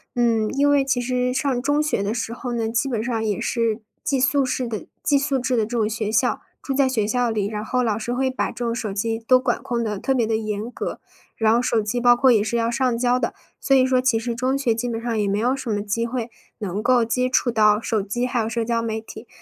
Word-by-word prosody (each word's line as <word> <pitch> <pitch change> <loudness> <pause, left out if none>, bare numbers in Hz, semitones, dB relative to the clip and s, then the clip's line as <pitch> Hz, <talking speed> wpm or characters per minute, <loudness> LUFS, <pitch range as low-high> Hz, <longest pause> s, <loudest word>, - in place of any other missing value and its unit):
嗯， 230 -3 +2
因 285 +1 +3
为 285 -1 +3
其 260 -2 +1
实 250 0 0
上 255 -1 0
中 290 +3 +1
学 300 -9 0
的 205 - -1
时 230 -1 -3
候 245 0 -5
呢， 225 -1 -1
基 235 +4 0
本 230 -4 -2
上 230 -3 -1
也 210 -3 -1
是 230 -2 0 0.2
寄 275 - 0
宿 270 +1 +3
式 255 -1 -2
的 220 -3 -5 0.2
寄 285 - +3
宿 275 -1 0
制 255 0 0
的 225 - +2
这 240 +2 -4
种 215 -2 +1
学 215 -1 -2
校。 - - +1 0.2
住 275 - -1
在 270 -1 +3
学 225 -5 0
校 245 +2 +1
里， 215 -3 -1
然 210 0 -4
后 250 +3 0
老 220 -3 +1
师 225 +3 -4
会 260 +2 0
把 255 - -1
这 240 - -5
种 230 - 0
手 225 -3 -3
机 225 +3 -2
都 255 +3 +4
管 255 -2 -1
控 235 -1 -2
得 210 -3 -3
特 265 +5 0
别 235 - +2
地 220 0 0
严 215 +1 -3
格， - - -5 0.4
然 220 0 +3
后 240 - +3
手 235 -2 +1
机 220 +3 -2
包 245 0 +6
括 260 +1 +4
也 220 - +4
是 235 +2 -1
要 230 0 0
上 245 -1 +1
交 245 +1 +2
的。 - - -2 0.3
所 270 -1 +4
以 255 - +4
说 260 -1 +2
其 255 -3 +2
实 235 +1 -2
中 255 +3 0
学 265 -4 +1
基 235 +2 -3
本 225 -1 -3
上 230 -1 -2
也 205 - +1
没 200 +1 0
有 245 +4 +1
什 265 -3 -6
么 205 -1 -1
机 230 +3 -1
会 235 -1 -4 0.3
能 205 -1 -3
够 245 -1 +3
接 250 +2 0
触 255 -1 +2
到 210 -2 +4
手 220 -2 -1
机 210 +5 -2
还 250 -1 -1
有 220 - -2
社 230 0 -2
交 230 0 0
媒 220 -1 -2
体。 220 +1 -11
235 Hz, 295 characters per minute, -22 LUFS, 220-255 Hz, 0.4 s, 包